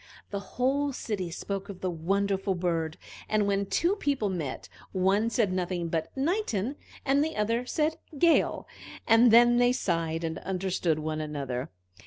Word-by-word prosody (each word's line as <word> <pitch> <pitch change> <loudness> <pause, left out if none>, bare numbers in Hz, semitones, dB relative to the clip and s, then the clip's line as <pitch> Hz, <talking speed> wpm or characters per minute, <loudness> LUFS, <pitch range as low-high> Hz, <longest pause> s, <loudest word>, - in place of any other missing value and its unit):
The 200 - -2 0.2
whole 280 +3 +1
city 200 -8 -3
spoke 195 +4 -5
of 195 -2 -8
the 185 - -1
wonderful 195 +3 0
bird, 165 -3 -1 0.3
and 215 -1 +2
when 200 0 0
two 350 - +2
people 280 - 0
met, 165 -8 -4 0.3
one 195 +4 +2
said 220 -5 +1
nothing 175 -2 -2
but 160 -1 -1
"Nightin," 275 - 0 0.3
and 280 +1 +3
the 320 - -3
other 230 +4 0
said 315 +3 0 0.2
"gale"; 335 +3 +3 0.4
and 230 +1 +6
then 240 +1 +7
they 245 0 +4
sighed, 165 -8 -1
and 160 -1 -3
understood 185 -4 -1
one 155 0 -3
another. 140 -5 -4
200 Hz, 155 wpm, -28 LUFS, 170-245 Hz, 0.4 s, then